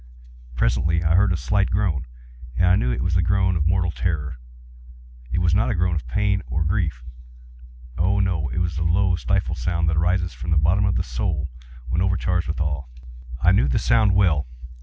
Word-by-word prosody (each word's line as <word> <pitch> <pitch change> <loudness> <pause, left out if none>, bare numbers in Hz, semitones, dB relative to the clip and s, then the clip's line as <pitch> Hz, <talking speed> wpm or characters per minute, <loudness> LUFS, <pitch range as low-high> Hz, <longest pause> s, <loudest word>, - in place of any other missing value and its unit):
Presently 70 +9 +1
I 80 0 +2
heard 95 +1 +3
a 90 - +1
slight 95 +9 0
groan, 90 -8 -1 0.5
and 90 - +2
I 90 +1 +5
knew 60 -7 0
it - - -2
was 90 -1 -1
the 90 - +3
groan 95 +1 +1
of 80 -1 0
mortal 90 -1 +1
terror. 75 -6 -3 0.9
It - - -1
was 90 -2 +2
not 100 +4 +2
a - - 0
groan 90 0 +1
of 75 -7 -4
pain 100 +4 0
or 80 - -2
of 80 - 0
grief—oh, - - -4
no!—it 85 -8 -1
was 85 -4 -1
the - - -3
low 90 +2 +2
stifled 75 0 -1
sound 85 +6 -1
that 80 - -1
arises 90 +1 0
from 85 - -7
the 80 - +2
bottom 85 +7 +2
of 100 - 0
the - - 0
soul 75 +5 -3 0.4
when 80 +6 0
overcharged 90 -2 0
with 80 - -3
awe. 75 -4 -2 0.6
I - - +5
knew 65 - +3
the 65 - 0
sound 110 -4 +3
well. 80 -9 +2
85 Hz, 200 wpm, -22 LUFS, 70-90 Hz, 0.9 s, I